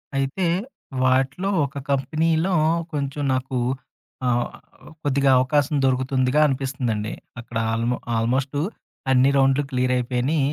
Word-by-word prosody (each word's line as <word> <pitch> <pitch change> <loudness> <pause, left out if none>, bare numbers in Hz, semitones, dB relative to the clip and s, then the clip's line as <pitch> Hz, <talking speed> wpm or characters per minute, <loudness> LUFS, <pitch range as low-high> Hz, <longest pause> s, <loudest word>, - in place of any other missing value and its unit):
అయితే 135 +7 0 0.6
వాటిలో 135 +9 +2 0.2
ఒక 140 0 -8
కంపెనీలో 160 +6 +1 0.4
కొంచెం 140 0 -2
నాకు 130 0 -2 0.7
ఆహ్, 120 0 +2 0.6
కొద్దిగా 140 -1 +2
అవకాశం 145 +3 +2
దొరుకుతుందిగా 130 +1 +1
అనిపిస్తుందండి, 130 -6 -2 0.3
అక్కడ 115 0 -6 0.2
ఆల్‌మో 115 +2 0 0.2
ఆల్‌మోస్టు 130 +5 0 0.5
అన్ని 130 +1 +5
రౌండ్‌లు 135 +1 +3
క్లియరయిపోయిని. 125 +3 0
135 Hz, 95 wpm, -23 LUFS, 125-140 Hz, 0.7 s, అన్ని